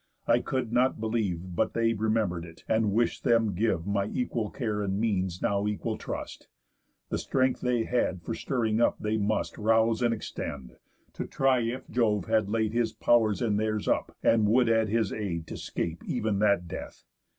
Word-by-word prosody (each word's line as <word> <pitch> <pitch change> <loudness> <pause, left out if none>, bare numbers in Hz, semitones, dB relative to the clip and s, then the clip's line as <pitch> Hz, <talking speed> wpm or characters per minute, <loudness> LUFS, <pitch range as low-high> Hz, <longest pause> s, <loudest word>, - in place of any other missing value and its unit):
I - - +4
could 130 -4 -3
not 125 0 +2
believe 100 -6 -2
But - - 0
they 115 0 +2
remember'd 110 -5 0
it, 80 -1 -13
and 110 -2 +2
wish'd 115 +3 0
them 115 -3 +3
give 95 -3 0
My 100 -1 0
equal 120 -3 -2
care 105 -3 -2
and 100 -1 -1
means 95 -5 -1
now 100 0 +1
equal 105 -1 -2
trust. - - -7 0.6
The - - -1
strength 130 -1 +1
they 125 -2 +1
had 95 -8 -1
for 115 - -3
stirring 115 -2 0
up - - +3
they 110 +1 -1
must 105 +1 -1
Rouse 110 +1 +3
and 120 -1 +3
extend, 70 - -5 0.4
to - - -5
try 135 -1 +2
if 120 +2 -3
Jove 105 -6 +1
had 110 -2 +1
laid 110 0 0
His 115 -2 +1
pow'rs 115 -1 +2
in 105 -3 +1
theirs 110 -1 -1
up, - - 0
and 110 -2 +4
would 120 +1 +4
add 110 -2 +3
his 110 -2 +1
aid 85 -7 -3
To - - -7
'scape 85 0 -4
ev'n 105 -2 0
that 100 -4 +2
death. - - -8
110 Hz, 185 wpm, -28 LUFS, 100-115 Hz, 0.6 s, I